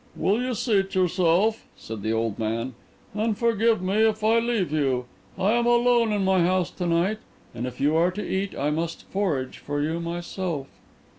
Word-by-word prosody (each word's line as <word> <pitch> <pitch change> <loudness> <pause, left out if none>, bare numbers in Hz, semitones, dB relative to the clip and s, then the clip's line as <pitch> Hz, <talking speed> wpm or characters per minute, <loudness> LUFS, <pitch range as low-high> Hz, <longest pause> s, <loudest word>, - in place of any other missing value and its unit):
"Will 210 +5 +1
you 250 -1 -1
seat 195 -4 0
yourself," 185 +4 +2
said 110 -2 -8
the 110 - -1
old 115 -1 -1
man, 115 +3 -2 0.4
"and 215 0 0
forgive 230 -3 +2
me 190 +3 0
if 220 -1 +2
I 225 +2 +4
leave 230 -8 0
you? 135 -5 0 0.3
I 195 +3 +2
am 240 +1 +2
alone 240 -1 +4
in 205 -2 0
my 190 -1 +3
house 185 0 +1
to 180 - -3
night, 175 +6 +1 0.3
and 120 +1 -4
if 125 0 -8
you 145 +3 +2
are 170 +2 +4
to 210 - -5
eat 195 +1 -2
I 145 +2 0
must 165 +2 -3
forage 160 -10 -2
for 145 0 -3
you 160 +3 -1
myself." 170 -2 -4
185 Hz, 190 wpm, -25 LUFS, 150-215 Hz, 0.4 s, I